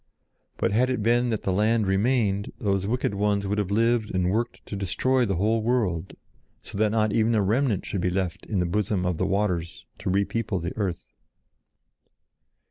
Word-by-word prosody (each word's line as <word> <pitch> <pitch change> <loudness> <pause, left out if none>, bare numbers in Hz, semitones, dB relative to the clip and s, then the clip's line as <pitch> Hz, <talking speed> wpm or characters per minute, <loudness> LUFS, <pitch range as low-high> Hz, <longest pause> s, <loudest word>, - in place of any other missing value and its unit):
But - - 0
had 125 +5 +2
it 125 -5 -1
been 120 +2 +2
that 110 -3 -2
the 95 - 0
land 110 +3 +2
remained, 100 0 +1
those 100 -2 0
wicked 120 -2 0
ones 100 0 0
would 105 +2 -1
have 100 -3 -1
lived 115 +1 +2
and 90 0 +1
worked 115 +4 -2
to - - -6
destroy 120 +6 +1
the 95 - 0
whole 110 +5 +1
world 105 -8 0 0.5
so - - -10
that 110 0 +3
not 110 -1 +1
even 115 +1 +2
a 105 - +3
remnant 110 0 +1
should 95 - -3
be 90 - +1
left 90 -2 -2
in 105 - -2
the 90 - +1
bosom 95 0 0
of 90 -2 0
the 95 - 0
waters 95 -4 -1
to - - -3
re 100 +2 +2
people 115 -3 -2
the 85 +2 -5
earth. 95 -5 -4
105 Hz, 195 wpm, -25 LUFS, 95-115 Hz, 0.5 s, that